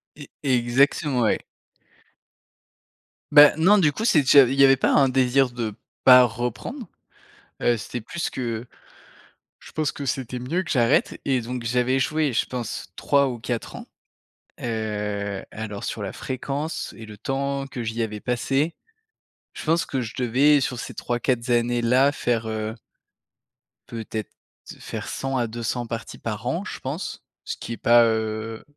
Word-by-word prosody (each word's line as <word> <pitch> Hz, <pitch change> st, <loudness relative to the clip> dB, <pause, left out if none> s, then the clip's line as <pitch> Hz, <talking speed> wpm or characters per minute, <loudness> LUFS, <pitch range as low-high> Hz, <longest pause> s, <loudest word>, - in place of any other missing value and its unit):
E 145 Hz, -1 st, -11 dB
exactement, 130 Hz, +2 st, +2 dB
ouais. 110 Hz, -, +1 dB, 1.9 s
Bah, 145 Hz, 0 st, +9 dB
non, 185 Hz, +6 st, +5 dB
du 155 Hz, -5 st, +4 dB
coup, 215 Hz, +10 st, -4 dB
c'est 175 Hz, -, +5 dB
déjà, 140 Hz, +1 st, +7 dB
il 130 Hz, +1 st, 0 dB
y -, -, +8 dB
avait 135 Hz, 0 st, +7 dB
pas -, -, +2 dB
un 135 Hz, -1 st, +4 dB
désir 130 Hz, 0 st, +3 dB
de 120 Hz, -3 st, -4 dB, 0.3 s
pas 125 Hz, -1 st, +9 dB
reprendre. 125 Hz, -, -4 dB, 0.7 s
Heu, 120 Hz, -, +3 dB
c'était 110 Hz, +4 st, -5 dB
plus 165 Hz, +9 st, -4 dB
que 120 Hz, -3 st, -4 dB, 0.9 s
je -, -, -14 dB
pense 155 Hz, -2 st, -1 dB
que 140 Hz, -, -6 dB
c'était 130 Hz, -1 st, -3 dB
mieux 160 Hz, +10 st, -1 dB
que -, -, -6 dB
j'arrête 120 Hz, 0 st, +2 dB
et 130 Hz, -2 st, +1 dB
donc 125 Hz, +1 st, -5 dB
j'avais, 125 Hz, +3 st, +1 dB
joué 150 Hz, +1 st, 0 dB
je -, -, +1 dB
pense, 125 Hz, -3 st, -5 dB
3 140 Hz, -1 st, +2 dB
ou 125 Hz, -2 st, -4 dB
4 115 Hz, 0 st, -4 dB
ans. -, -, -9 dB, 0.8 s
Heu, 105 Hz, -3 st, -3 dB
alors, 105 Hz, -2 st, -6 dB
sur -, -, -4 dB
la -, -, -4 dB
fréquence 140 Hz, +4 st, -4 dB
et 110 Hz, -, -9 dB
le 105 Hz, -1 st, -11 dB
temps 135 Hz, +3 st, -2 dB
que 130 Hz, -3 st, -6 dB
j'y 115 Hz, +1 st, -3 dB
avais 105 Hz, -1 st, -4 dB
passé, 135 Hz, +7 st, 0 dB, 0.8 s
je -, -, -8 dB
pense 165 Hz, +2 st, +2 dB
que 135 Hz, -, -3 dB
je 115 Hz, -3 st, -5 dB
devais, 135 Hz, +4 st, +4 dB
sur 125 Hz, -2 st, -2 dB
ces -, -, -7 dB
3-4 120 Hz, 0 st, -1 dB
années-là, 120 Hz, +3 st, +3 dB
faire 120 Hz, -5 st, -1 dB
heu 110 Hz, 0 st, -3 dB, 1.1 s
peut-être 110 Hz, -2 st, -6 dB, 0.5 s
faire -, -, -6 dB
100 135 Hz, 0 st, -2 dB
à 120 Hz, -2 st, 0 dB
200 120 Hz, +2 st, -3 dB
parties 115 Hz, 0 st, -6 dB
par -, -, -5 dB
an, -, -, -1 dB
je -, -, -7 dB
pense, -, -, -5 dB, 0.2 s
ce -, -, -5 dB
qui 115 Hz, -, -6 dB
est -, -, -7 dB
pas, 120 Hz, 0 st, +5 dB
heu 110 Hz, 0 st, -2 dB
125 Hz, 160 wpm, -24 LUFS, 115-135 Hz, 1.9 s, Bah